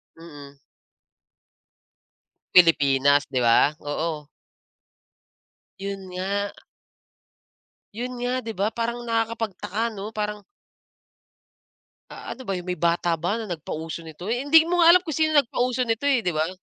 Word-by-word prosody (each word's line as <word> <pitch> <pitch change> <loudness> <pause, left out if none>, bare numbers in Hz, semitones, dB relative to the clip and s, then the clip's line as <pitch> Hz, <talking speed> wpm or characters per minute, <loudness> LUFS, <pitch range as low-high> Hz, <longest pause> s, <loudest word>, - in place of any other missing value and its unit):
Mm. 145 -4 -13 2.0
Pilipinas, 145 -5 +5
'di 130 -2 -1
ba? 120 +5 +4
Oo. 150 0 -3 1.5
'Yon 195 0 -5
nga. 195 +3 -2 1.4
'Yon 250 +3 -4
nga, 245 +1 -1
'di 225 - -4
ba, 200 - +2
parang 235 +1 -3
nakakapagtaka, 225 -2 -2
'no, 205 +2 -6
parang 210 -1 -3 1.7
A - - -8
ano 260 +1 -9
ba 195 - -1
'yon, 180 - -5
may 180 0 -4
bata 170 -1 +1
ba 175 +6 -1
na 225 -4 -5
nagpauso 160 0 -5
nito? 165 +5 -7
Eh, 245 - 0
hindi 300 +4 +5
mo 350 +2 -1
nga 340 0 +8
alam 365 - +5
kung 320 - -5
sino 310 -1 +2
nagpauso 250 -2 +2
nito, 230 +3 -1
eh, 265 -5 +2
'di 180 - 0
ba? 155 0 0
200 Hz, 135 wpm, -24 LUFS, 165-235 Hz, 2.0 s, nga